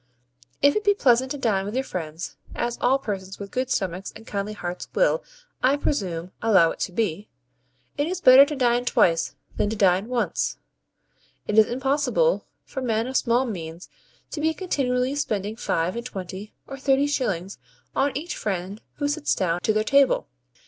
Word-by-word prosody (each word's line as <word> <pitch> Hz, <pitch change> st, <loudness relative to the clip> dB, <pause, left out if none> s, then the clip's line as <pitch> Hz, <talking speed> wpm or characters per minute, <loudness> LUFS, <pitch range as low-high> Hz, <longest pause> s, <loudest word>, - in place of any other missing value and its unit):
If 285 Hz, 0 st, +6 dB
it 425 Hz, -, 0 dB
be 410 Hz, -1 st, +4 dB
pleasant 260 Hz, -6 st, +3 dB
to 290 Hz, -, -3 dB
dine 215 Hz, -7 st, +1 dB
with 205 Hz, +4 st, -5 dB
your 265 Hz, -, +1 dB
friends, 160 Hz, -, -6 dB, 0.2 s
as 240 Hz, 0 st, -1 dB
all 260 Hz, +2 st, +4 dB
persons 195 Hz, -6 st, -5 dB
with 200 Hz, -1 st, -8 dB
good 255 Hz, 0 st, -1 dB
stomachs 190 Hz, -3 st, -2 dB
and 220 Hz, -, -12 dB
kindly 205 Hz, 0 st, -3 dB
hearts 180 Hz, -3 st, -5 dB
will, -, -, +2 dB, 0.4 s
I 270 Hz, +3 st, +3 dB
presume, 180 Hz, -, -2 dB
allow 190 Hz, -7 st, +5 dB
it -, -, -9 dB
to -, -, -2 dB
be, 205 Hz, -1 st, -2 dB, 0.7 s
it 290 Hz, -, +1 dB
is 365 Hz, +1 st, -3 dB
better 260 Hz, -4 st, +9 dB
to 300 Hz, -, -3 dB
dine 245 Hz, -2 st, +2 dB
twice 165 Hz, -8 st, +2 dB, 0.2 s
than 205 Hz, -, +1 dB
to 220 Hz, -, -2 dB
dine 195 Hz, 0 st, +3 dB
once. 245 Hz, -1 st, -1 dB, 0.9 s
It 210 Hz, -, -1 dB
is 215 Hz, -, +6 dB
impossible 280 Hz, -, +1 dB, 0.2 s
for 265 Hz, -, -6 dB
men 225 Hz, -2 st, 0 dB
of 260 Hz, +1 st, -5 dB
small 245 Hz, +1 st, +2 dB
means 170 Hz, -6 st, -6 dB, 0.4 s
to 300 Hz, -, -4 dB
be 320 Hz, +1 st, +1 dB
continually 260 Hz, -7 st, 0 dB
spending 215 Hz, -7 st, -2 dB
five 175 Hz, -4 st, -1 dB
and 235 Hz, -, -4 dB
twenty 195 Hz, -2 st, -7 dB
or 275 Hz, 0 st, -8 dB
thirty 270 Hz, +1 st, +3 dB
shillings 200 Hz, -10 st, -2 dB, 0.4 s
on 280 Hz, +1 st, +2 dB
each 330 Hz, +4 st, -5 dB
friend 195 Hz, +1 st, -4 dB
who 290 Hz, -, -1 dB
sits 290 Hz, +1 st, 0 dB
down 175 Hz, -2 st, 0 dB
to 215 Hz, -, +2 dB
their 215 Hz, 0 st, +1 dB
table. 280 Hz, -, +3 dB
235 Hz, 180 wpm, -24 LUFS, 195-275 Hz, 0.9 s, better